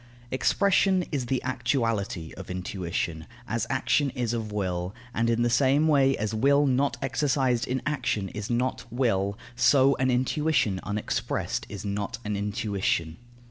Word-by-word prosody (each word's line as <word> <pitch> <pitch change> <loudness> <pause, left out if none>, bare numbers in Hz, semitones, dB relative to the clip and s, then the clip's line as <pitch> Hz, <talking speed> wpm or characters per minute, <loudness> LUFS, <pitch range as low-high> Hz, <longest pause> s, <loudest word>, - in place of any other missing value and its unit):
Expression 190 +6 +3
is 135 -5 -2
the 130 +1 -1
actuality 115 - -1
of 95 - -9
intuition, 90 -3 -3 0.2
as 115 0 -1
action 135 +2 +2
is 120 -2 -1
of 110 -2 -3
will; 90 -1 -2 0.2
and 115 +1 +1
in 115 0 +2
the - - +3
same 140 +5 +3
way 135 -3 +4
as 105 +1 -2
will 140 +6 +4
not 135 -2 +1
exercised 135 -3 +1
in 130 0 -2
action 120 -9 -1
is 105 0 -6
not 125 +2 0
will, 100 -5 0 0.2
so 135 +1 +5
an 130 0 +1
intuition 130 -4 +1
unexpressed 105 0 -2
is 100 +1 -7
not 100 0 -3
an 105 0 -1
intuition. 100 -5 -1
120 Hz, 145 wpm, -27 LUFS, 100-135 Hz, 0.2 s, so